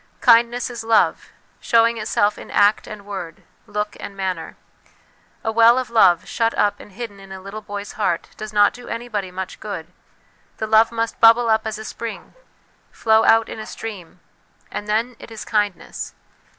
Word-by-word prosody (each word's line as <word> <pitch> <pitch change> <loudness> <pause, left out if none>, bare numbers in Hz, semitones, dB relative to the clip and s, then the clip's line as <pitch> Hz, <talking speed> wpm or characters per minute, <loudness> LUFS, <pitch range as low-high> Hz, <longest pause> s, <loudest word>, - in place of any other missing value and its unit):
Kindness 240 +2 +4
is 235 -2 -6
love, 225 -1 +2 0.3
showing 230 0 +3
itself 210 -1 +1
in - - -11
act 205 +1 +3
and 215 -3 -9
word, 190 -5 -7 0.2
look 210 0 -3
and 200 - -8
manner. 185 -4 -4 0.9
A 220 - 0
well 230 +2 +6
of 255 -3 -2
love, 180 -7 +4
shut 230 -1 0
up 205 0 +2
and 205 - -14
hidden 210 -2 -7
in 195 0 -13
a 190 - -7
little 195 +3 -8
boy's 205 -1 -6
heart, 190 -6 -1
does 215 0 -7
not 205 -1 +4
do 245 0 -12
anybody 230 -5 -4
much 185 +1 -6
good; 180 -5 -7 0.6
the 220 - -2
love 220 +1 +4
must 230 0 -2
bubble 230 0 +6
up 220 0 +1
as 220 0 -4
a 220 - -8
spring, 230 0 -7 0.6
flow 220 0 +3
out 225 0 +5
in - - -7
a 215 - -7
stream, 190 -6 -8 0.5
and 210 - -5
then 225 +4 0
it - - -11
is 225 -1 -8
kindness. 205 -4 -2
215 Hz, 175 wpm, -21 LUFS, 200-230 Hz, 0.9 s, well